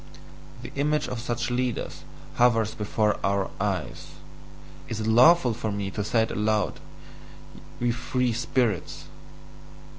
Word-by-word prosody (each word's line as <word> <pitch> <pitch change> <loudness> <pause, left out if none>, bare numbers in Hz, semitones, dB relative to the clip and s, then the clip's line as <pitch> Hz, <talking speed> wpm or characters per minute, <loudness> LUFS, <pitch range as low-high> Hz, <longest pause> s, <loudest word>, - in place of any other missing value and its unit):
The 120 - -8
image 150 +2 0
of 125 - -4
such 120 0 -2
leaders 125 -1 -2 0.4
hovers 115 -3 +3
before 105 0 0
OUR 100 0 0
eyes: - - -3 0.8
is 115 - -4
it - - -3
lawful 125 +4 +6
for 110 -1 -3
me 100 -1 -3
to 105 - -3
say 110 +2 +2
it 110 - -3
aloud, 105 0 0 1.0
ye 120 0 +1
free 125 +1 -1
spirits? 120 - -1
115 Hz, 125 wpm, -26 LUFS, 105-125 Hz, 1.0 s, lawful